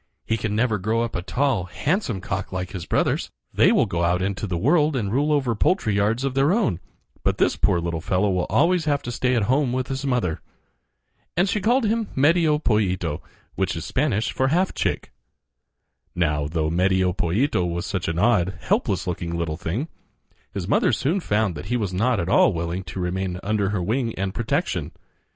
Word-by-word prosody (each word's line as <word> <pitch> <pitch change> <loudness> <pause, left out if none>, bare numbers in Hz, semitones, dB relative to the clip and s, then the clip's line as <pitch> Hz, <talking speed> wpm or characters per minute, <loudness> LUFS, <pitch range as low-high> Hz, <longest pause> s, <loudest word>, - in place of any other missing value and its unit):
He 110 - 0
can 110 -1 -2
never 110 -2 +1
grow 110 +5 0
up 115 - -4
a 90 - -1
tall, 125 -1 0
handsome 125 - -1
cock 95 +2 -4
like 95 -1 -4
his 95 -5 -6
brothers. - - 0 0.2
They - - +5
will - - +4
go 85 0 -2
out 85 +1 +2
into 100 +2 -2
the 90 -2 -2
world 150 - +3
and 105 -6 -1
rule 145 +4 +2
over 135 -5 +1
poultry 115 - +1
yards 105 +5 +1
of 135 -1 -1
their 135 +4 +3
own; 195 - +1 0.4
but - - 0
this - - +2
poor 85 - +2
little 85 -1 -3
fellow 95 +4 +1
will 90 -1 0
always 170 -1 +3
have 145 -2 0
to 120 - -4
stay 125 +1 0
at 115 - +2
home 130 +4 +2
with 130 0 -2
his 135 0 -3
mother." 125 - -1 1.0
And 180 +3 +3
she 210 +1 0
called 240 +5 +2
him 220 0 0
Medio 155 +2 +3
Pollito, 95 - 0 0.3
which - - -1
is - - -5
Spanish 115 -6 0
for 130 - +1
half 180 +7 +1
chick. - - -2 1.0
Now, 75 -4 0
though 80 0 -1
Medio 95 +1 +2
Pollito 90 - +1
was 85 0 -2
such 95 -3 -3
an 80 0 -2
odd, 95 -3 +2
helpless - - 0
looking 85 -1 -3
little 85 -2 -2
thing, 95 - -3 0.6
his - - -4
mother - - +3
soon 165 +8 0
found 105 - 0
that 75 +4 -8
he 125 - 0
was 100 -5 -2
not 110 +4 +1
at 85 - -2
all 95 - +4
willing 85 +2 -3
to 90 +2 -6
remain 90 0 -2
under 100 -1 0
her 100 -3 -1
wing 115 +4 -1
and 95 0 -2
protection. 115 - -2
105 Hz, 200 wpm, -23 LUFS, 90-135 Hz, 1.0 s, They